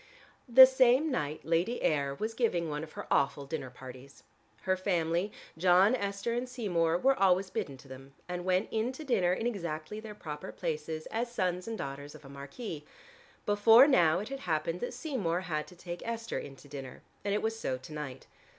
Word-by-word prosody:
The 260 +2 +11
same 260 +3 +4
night 150 - -2
Lady 170 +9 0
Ayr 140 -2 +1
was 220 +9 -3
giving 220 -8 0
one 150 +1 -3
of 155 - -10
her - - -7
awful 140 0 +2
dinner 145 -2 -5
parties. 130 +2 -12 0.4
Her 185 - +2
family, 180 0 0 0.3
John, 185 +5 +5
Esther 200 +1 -2
and 245 +1 -2
Seymour 175 -9 +1
were 270 +8 +4
always 190 -3 +3
bidden 140 -6 -3
to 135 - -16
them, 135 +1 -12
and 180 0 -4
went 185 +2 +1
in 225 +3 0
to 310 - -8
dinner 190 -11 +2
in 205 +5 -1
exactly 170 -4 -3
their 215 -1 -9
proper 150 -7 -7
places 155 -2 -4
as 235 +2 -2
sons 180 -4 -1
and 225 -1 -4
daughters 140 -1 -6
of - - -14
a - - -11
marquis. 145 - -7 0.6
Before 225 +5 +7
now 170 - +4
it 210 +6 -4
had 275 0 -5
happened 165 -1 -1
that 245 - -4
Seymour 195 - -1
had 155 -5 -3
to 180 - -14
take 175 0 -7
Esther 230 0 -3
in 135 - -9
to 145 - -16
dinner, 135 -2 -9 0.2
and 200 0 0
it 210 - -1
was 225 0 -1
so 130 -9 -2
to 130 +4 -11
night. 140 -4 -6
180 Hz, 195 wpm, -31 LUFS, 150-225 Hz, 0.6 s, The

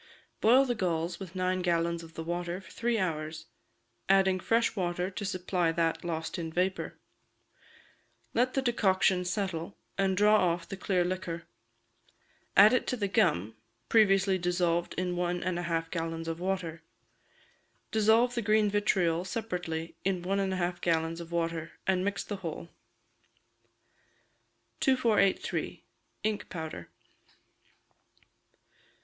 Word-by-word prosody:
Boil 255 +5 +6
the 245 - 0
galls 170 -4 -1
with 190 -2 -9
nine 185 0 0
gallons 170 -1 0
of 165 -1 -13
the 165 - -4
water 175 +1 -3
for 190 - -15
three 235 0 0
hours, 155 -4 -3 0.6
adding 190 -1 +4
fresh 230 +5 +1
water 180 -1 -1
to 200 - -5
supply 185 -3 0
that 165 0 0
lost 165 0 -3
in 165 -1 -4
vapour; 185 +3 -1 1.4
let 250 +2 +1
the 270 - +1
decoction 190 -6 +2
settle, 180 -2 -3 0.2
and 190 -1 +2
draw 210 +1 +6 0.2
off 170 0 -7
the 195 - -5
clear 185 -1 +1
liquor. 175 -2 -3 1.1
Add 205 +2 +9 0.2
to - - 0
it - - -11
the 200 - +1
gum, 155 - +1 0.3
previously 195 -3 +4
dissolved 175 -1 0
in 180 0 -1
one 175 0 -1
and 180 -1 -1
a 175 -1 -4
half 165 -1 -1
gallons 165 -1 -3
of 165 0 -3
water; 180 -3 -2 1.1
dissolve 220 +3 +4
the 240 - -1
green 215 -1 +3
vitriol 180 -5 +2
separately 175 -5 -4
in 185 -2 0
one 195 +2 0
and 195 -1 0
a 190 - -1
half 175 0 -2
gallons 165 0 0
of 170 0 -10
water, 165 -1 -2
and 185 -1 +2
mix 200 0 -1
the 205 - -5
whole. 170 -2 -6 2.1
2483. 230 -7 +1 0.4
Ink 215 -1 -2
Powder. 160 - -6
180 Hz, 135 wpm, -30 LUFS, 170-195 Hz, 2.1 s, Add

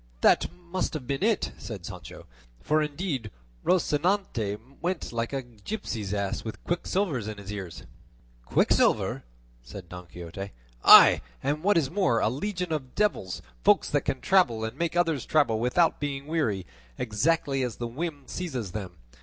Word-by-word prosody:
"That - - +4
must 180 0 -4
have 145 -5 -5
been 135 +1 -2
it," 220 +1 +1
said 100 -7 -7
Sancho, - - -9 0.3
"for 155 - +2
indeed 150 - -2 0.3
Rocinante 150 - +1 0.2
went 175 -6 -2
like 115 0 -2
a 135 -1 -2
gipsy's 115 - -5
ass 100 -1 -2
with 110 - -7
quicksilver 175 -3 0
in 110 -1 -6
his 100 0 -8
ears." 95 -5 -7 0.6
"Quicksilver!" - - +2 0.4
said 85 +9 -10
Don 90 0 -9
Quixote, 90 +3 -8 0.3
"aye - - +9 0.2
and 145 +2 0
what 205 +2 +3
is 150 -4 +1
more, 180 - +2
a 110 - +2
legion 180 - -3
of 135 -5 -4
devils, 95 - 0 0.2
folk - - +5
that - - +1
can 135 -2 -2
travel 125 -13 +3
and 110 - -3
make 170 0 -2
others 165 -6 +2
travel 140 -8 +2
without 125 +9 +2
being 140 -1 -3
weary, 140 - -1 0.3
exactly 135 +4 +1
as 125 -4 -2
the 120 - -4
whim 145 +4 -4
seizes 130 - -4
them. 95 -3 -6
135 Hz, 155 wpm, -27 LUFS, 110-170 Hz, 0.6 s, aye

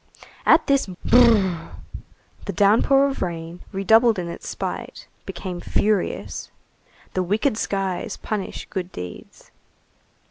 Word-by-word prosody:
At - - +6
this 275 -4 +2
brrr! 190 -3 +3 0.7
the 200 - -3
downpour 225 +9 +4
of 275 - -4
rain, 170 -1 -4
redoubled 220 +3 +4
in 175 -2 -3
its 170 - -8
spite, - - -5 0.2
became 180 -3 -5
furious. 210 -2 -1 0.6
The 185 - 0
wicked 210 +7 +1
skies 195 -4 -2
punish 210 -3 -4
good 185 -2 -4
deeds. 90 0 -10
195 Hz, 110 wpm, -23 LUFS, 180-220 Hz, 0.7 s, At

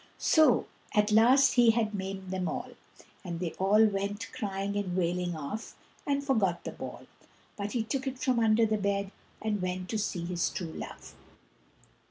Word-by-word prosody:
So 310 -7 +4 0.3
at 210 0 +3
last 250 +5 +6
he 240 -2 +6
had 220 -2 +2
maimed 190 -1 -5
them 185 -1 -1
all, - - -4 0.5
and 170 -3 -5
they 175 -2 -2
all 205 +3 +5
went 205 +1 -2
crying 200 -4 -3
and 190 -3 -2
wailing 175 0 0
off, 155 +9 -6 0.3
and 280 0 +1
forgot 205 -10 +1
the - - -5
ball, - - -8 0.5
but 205 0 -4
he 235 -3 0
took 265 +4 -3
it 265 -1 -3
from 255 -2 +1
under 225 0 +4
the 215 -1 0
bed, 200 -1 -1 0.3
and 210 -3 -1
went 185 0 -3
to 220 - -1
seek 175 -4 -3
his 175 -2 0
true 165 -3 -5
love. - - -8
205 Hz, 175 wpm, -30 LUFS, 185-225 Hz, 0.5 s, last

